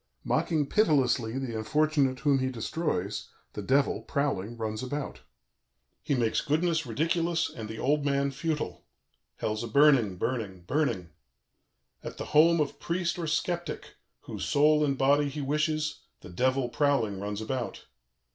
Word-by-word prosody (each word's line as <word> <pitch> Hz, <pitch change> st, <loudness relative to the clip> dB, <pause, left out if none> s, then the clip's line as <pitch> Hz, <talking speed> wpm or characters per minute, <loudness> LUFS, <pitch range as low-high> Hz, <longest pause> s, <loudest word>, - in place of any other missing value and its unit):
"Mocking 155 Hz, -4 st, +1 dB
pitilessly 135 Hz, -, +2 dB
the 130 Hz, -4 st, -3 dB
unfortunate 145 Hz, +1 st, +1 dB
whom 140 Hz, -2 st, +3 dB
he 130 Hz, 0 st, 0 dB
destroys, 115 Hz, -, -3 dB, 0.2 s
the -, -, -5 dB
Devil, 140 Hz, +1 st, +2 dB
prowling, 120 Hz, -6 st, -2 dB
runs 110 Hz, -1 st, -3 dB
about. 140 Hz, +3 st, -5 dB, 0.8 s
"He 140 Hz, -, 0 dB
makes 115 Hz, -3 st, +1 dB
goodness 160 Hz, 0 st, 0 dB
ridiculous 165 Hz, +6 st, 0 dB
and 110 Hz, -2 st, -7 dB
the 110 Hz, -, -6 dB
old 145 Hz, +4 st, +1 dB
man 140 Hz, -1 st, +1 dB
futile. 145 Hz, -, -3 dB, 0.5 s
Hell's 110 Hz, +1 st, -2 dB
a -, -, -4 dB
burning, 135 Hz, -10 st, +4 dB
burning, 100 Hz, -5 st, -3 dB
burning. 110 Hz, -, -1 dB, 0.9 s
"At -, -, -7 dB
the -, -, -5 dB
home 165 Hz, +2 st, +6 dB
of 150 Hz, -2 st, -1 dB
priest 170 Hz, 0 st, -1 dB
or 165 Hz, -, -2 dB
sceptic, 175 Hz, +2 st, -2 dB, 0.3 s
whose -, -, -6 dB
soul 150 Hz, +1 st, +4 dB
and 140 Hz, -2 st, +1 dB
body 140 Hz, +2 st, +3 dB
he 145 Hz, +2 st, -5 dB
wishes, 150 Hz, +2 st, -1 dB, 0.2 s
the -, -, -11 dB
Devil, 130 Hz, +5 st, +1 dB
prowling, 130 Hz, -8 st, +1 dB
runs 100 Hz, +1 st, -4 dB
about. 120 Hz, +2 st, -4 dB
140 Hz, 145 wpm, -28 LUFS, 115-150 Hz, 0.9 s, home